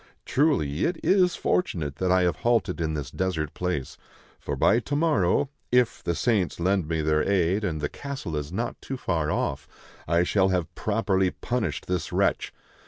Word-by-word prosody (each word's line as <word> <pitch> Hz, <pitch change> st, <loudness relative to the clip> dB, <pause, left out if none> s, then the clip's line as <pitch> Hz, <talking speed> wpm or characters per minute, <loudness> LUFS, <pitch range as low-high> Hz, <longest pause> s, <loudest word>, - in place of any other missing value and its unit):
Truly, 115 Hz, -, +1 dB
it 175 Hz, -, 0 dB
is 185 Hz, -2 st, +4 dB
fortunate 80 Hz, -, -1 dB
that 90 Hz, +1 st, 0 dB
I 90 Hz, 0 st, +4 dB
have 90 Hz, -, +1 dB
halted 115 Hz, -7 st, +1 dB
in 80 Hz, -1 st, -1 dB
this 75 Hz, -2 st, -5 dB
desert 80 Hz, -5 st, -2 dB
place; 85 Hz, -8 st, -3 dB, 0.4 s
for -, -, -4 dB
by 115 Hz, -, +4 dB
to 145 Hz, +4 st, -3 dB
morrow 145 Hz, -, +2 dB
— -, -, -45 dB
if 125 Hz, -1 st, +2 dB
the 85 Hz, -, -1 dB
saints 95 Hz, +2 st, 0 dB
lend 95 Hz, -1 st, +1 dB
me 80 Hz, -1 st, -1 dB
their 75 Hz, 0 st, +2 dB
aid 95 Hz, +2 st, +1 dB
and 80 Hz, -6 st, -1 dB
the 75 Hz, -, 0 dB
castle 135 Hz, -, -6 dB
is 75 Hz, +1 st, -4 dB
not 115 Hz, +6 st, -3 dB
too 135 Hz, -, -5 dB
far 80 Hz, -10 st, -1 dB
off -, -, -2 dB, 0.2 s
— -, -, -23 dB
I 85 Hz, +2 st, +3 dB
shall 95 Hz, +1 st, +2 dB
have 90 Hz, -2 st, -1 dB
properly 100 Hz, -2 st, +1 dB
punished 105 Hz, -8 st, -3 dB
this 90 Hz, -3 st, -2 dB
wretch. -, -, +1 dB
90 Hz, 185 wpm, -26 LUFS, 80-115 Hz, 0.4 s, is